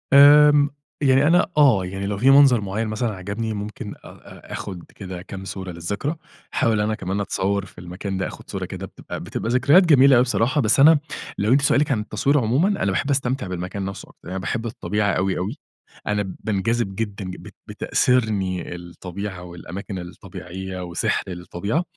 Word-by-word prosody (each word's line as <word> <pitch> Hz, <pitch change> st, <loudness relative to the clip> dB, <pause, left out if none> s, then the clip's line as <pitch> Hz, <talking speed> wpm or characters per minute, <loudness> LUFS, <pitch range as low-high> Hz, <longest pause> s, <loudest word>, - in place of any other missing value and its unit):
آمم 145 Hz, +1 st, +8 dB, 0.3 s
يعني 135 Hz, 0 st, +4 dB
أنا 175 Hz, +3 st, +3 dB
آه. 125 Hz, -11 st, +5 dB
يعني 95 Hz, +2 st, -5 dB
لو 100 Hz, 0 st, -2 dB
في 125 Hz, +6 st, +4 dB
منظر 135 Hz, -4 st, +6 dB
معيّن 100 Hz, +3 st, -2 dB
مثلًا 110 Hz, 0 st, -2 dB
عجبني 100 Hz, +4 st, -4 dB
ممكن 105 Hz, 0 st, -6 dB
أ -, -, -22 dB
أ -, -, -14 dB
آخُد 90 Hz, -4 st, -6 dB
كده 95 Hz, -3 st, -7 dB
كام 95 Hz, 0 st, -8 dB
صورة 95 Hz, -1 st, -6 dB
للذكرى، 100 Hz, -, -3 dB, 0.4 s
أحاول 110 Hz, -2 st, +2 dB
أنا 110 Hz, +1 st, 0 dB
كمان 95 Hz, 0 st, -3 dB
أتصوّر 100 Hz, 0 st, -1 dB
في -, -, -18 dB
المكان 90 Hz, +2 st, -5 dB
ده، 95 Hz, -, -1 dB
آخُد -, -, -11 dB
صورة -, -, -4 dB
كده -, -, -7 dB
بتبقى -, -, -8 dB
بتبقى 115 Hz, -, -4 dB
ذكريات 140 Hz, +9 st, +5 dB
جميلة 140 Hz, -4 st, +6 dB
أوي 120 Hz, -, +6 dB
بصراحة، 130 Hz, +3 st, +1 dB
بس 115 Hz, +2 st, +2 dB
أنا 155 Hz, +2 st, +7 dB, 0.4 s
لو 105 Hz, +5 st, +2 dB
أنتِ 140 Hz, -, +4 dB
سؤالِك 140 Hz, +1 st, +2 dB
عن 120 Hz, -, +1 dB
التصوير 135 Hz, +6 st, 0 dB
عمومًا، 130 Hz, -, +2 dB, 0.2 s
أنا -, -, +1 dB
باحب 140 Hz, -, -1 dB
أستمتع 130 Hz, -4 st, 0 dB
بالمكان 90 Hz, +2 st, -4 dB
نفسه 95 Hz, 0 st, -7 dB
أكتر، -, -, -18 dB
يعني 95 Hz, +1 st, -3 dB
باحب 115 Hz, +4 st, -3 dB
الطبيعة 105 Hz, -2 st, -1 dB
أوي، 95 Hz, 0 st, 0 dB
أوي. 100 Hz, -, -3 dB, 0.5 s
أنا 105 Hz, -2 st, -1 dB
بانجذب 110 Hz, 0 st, -1 dB
جدًا 100 Hz, -2 st, -4 dB
ج 90 Hz, 0 st, -6 dB
بت -, -, -13 dB
بتأسرني 100 Hz, -8 st, 0 dB
الطبيعة 90 Hz, +2 st, -7 dB
والأماكن 90 Hz, +2 st, -7 dB
الطبيعية 90 Hz, +1 st, -8 dB
وسحر 85 Hz, -1 st, -1 dB
الطبيعة، 90 Hz, -, -3 dB
105 Hz, 180 wpm, -22 LUFS, 95-130 Hz, 0.5 s, آمم